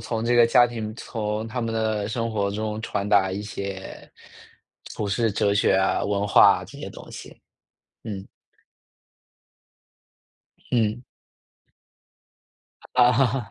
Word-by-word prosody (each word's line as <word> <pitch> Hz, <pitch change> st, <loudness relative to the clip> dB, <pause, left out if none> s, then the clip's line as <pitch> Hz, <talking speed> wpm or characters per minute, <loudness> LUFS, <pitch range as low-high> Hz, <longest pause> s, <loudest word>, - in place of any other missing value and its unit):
从 110 Hz, 0 st, -3 dB
这 120 Hz, +1 st, +2 dB
个 120 Hz, -1 st, +6 dB
家 120 Hz, +1 st, +5 dB
庭 110 Hz, -3 st, -6 dB
从 110 Hz, -1 st, -4 dB
他 120 Hz, +2 st, -4 dB
们 115 Hz, -1 st, -2 dB
的 110 Hz, -2 st, -1 dB
生 115 Hz, +1 st, -2 dB
活 100 Hz, -2 st, 0 dB
中 105 Hz, +1 st, -3 dB
传 100 Hz, -2 st, -3 dB
达 95 Hz, -2 st, +4 dB
一 100 Hz, +2 st, -4 dB
些， 100 Hz, -2 st, -7 dB, 0.8 s
普 105 Hz, -, -3 dB
世 110 Hz, +3 st, 0 dB
哲 100 Hz, 0 st, +1 dB
学 100 Hz, -, +3 dB
啊、 95 Hz, 0 st, +1 dB
文 100 Hz, 0 st, -1 dB
化 100 Hz, -, +6 dB
啊， -, -, -8 dB
这 -, -, -13 dB
些 -, -, -6 dB
东 -, -, -12 dB
西， -, -, -10 dB, 0.7 s
嗯。 100 Hz, -4 st, -6 dB, 2.4 s
嗯。 115 Hz, -1 st, 0 dB, 1.9 s
啊。 125 Hz, -1 st, +3 dB
110 Hz, 140 characters per minute, -24 LUFS, 100-115 Hz, 2.4 s, 个